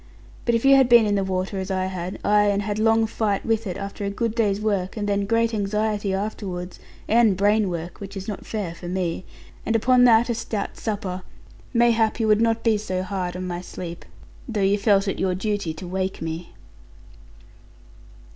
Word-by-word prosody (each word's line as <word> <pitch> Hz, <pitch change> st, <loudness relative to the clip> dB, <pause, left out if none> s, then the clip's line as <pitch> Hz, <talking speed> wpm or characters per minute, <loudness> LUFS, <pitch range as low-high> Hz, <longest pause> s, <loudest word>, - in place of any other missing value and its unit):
But 235 Hz, -, +2 dB
if 230 Hz, -, 0 dB
you 275 Hz, 0 st, +8 dB
had 265 Hz, -2 st, +4 dB
been 235 Hz, -2 st, +7 dB
in 205 Hz, -, +1 dB
the 200 Hz, -1 st, +1 dB
water 190 Hz, +1 st, -2 dB
as 190 Hz, -, -4 dB
I 185 Hz, -1 st, 0 dB
had, 185 Hz, -1 st, -4 dB
ay, 210 Hz, 0 st, +4 dB
and 205 Hz, 0 st, +1 dB
had 205 Hz, +1 st, -2 dB
long 225 Hz, 0 st, +4 dB
fight 215 Hz, -2 st, -1 dB
with 225 Hz, -1 st, 0 dB
it, 180 Hz, -, -4 dB
after 200 Hz, +1 st, -6 dB
a 200 Hz, -, -1 dB
good 220 Hz, +2 st, -2 dB
day's 210 Hz, -4 st, +1 dB
work, 200 Hz, -2 st, -1 dB
and 205 Hz, -1 st, -2 dB
then 200 Hz, -1 st, 0 dB
great 230 Hz, +1 st, +2 dB
anxiety 210 Hz, 0 st, -1 dB
afterwards, 190 Hz, -2 st, -4 dB, 0.3 s
and 225 Hz, -4 st, +4 dB
brain 205 Hz, +1 st, +3 dB
work 170 Hz, 0 st, -5 dB
(which 200 Hz, 0 st, -8 dB
is 190 Hz, -, -6 dB
not 210 Hz, -, -5 dB
fair 205 Hz, -6 st, -4 dB
for 175 Hz, +1 st, -9 dB
me), 180 Hz, -1 st, -2 dB, 0.4 s
and 225 Hz, -, 0 dB
upon 250 Hz, +2 st, +5 dB
that 230 Hz, -1 st, +5 dB
a 240 Hz, -, 0 dB
stout 220 Hz, -2 st, -4 dB
supper, 195 Hz, -4 st, -3 dB, 0.5 s
mayhap 230 Hz, -2 st, +3 dB
you 225 Hz, -, +1 dB
would 215 Hz, 0 st, +4 dB
not 230 Hz, 0 st, +1 dB
be 220 Hz, -3 st, +3 dB
so 185 Hz, -3 st, -3 dB
hard 180 Hz, -1 st, -3 dB
on 185 Hz, -, -4 dB
my 175 Hz, -1 st, -4 dB
sleep; 175 Hz, -1 st, -8 dB, 0.5 s
though 220 Hz, -3 st, -2 dB
you 200 Hz, +2 st, +3 dB
felt 200 Hz, -1 st, +3 dB
it 195 Hz, -, -2 dB
your 185 Hz, -1 st, +1 dB
duty 205 Hz, -3 st, -2 dB
to 175 Hz, -, -8 dB
wake 190 Hz, +1 st, -2 dB
me. 165 Hz, +1 st, -5 dB
205 Hz, 205 wpm, -23 LUFS, 185-220 Hz, 0.5 s, you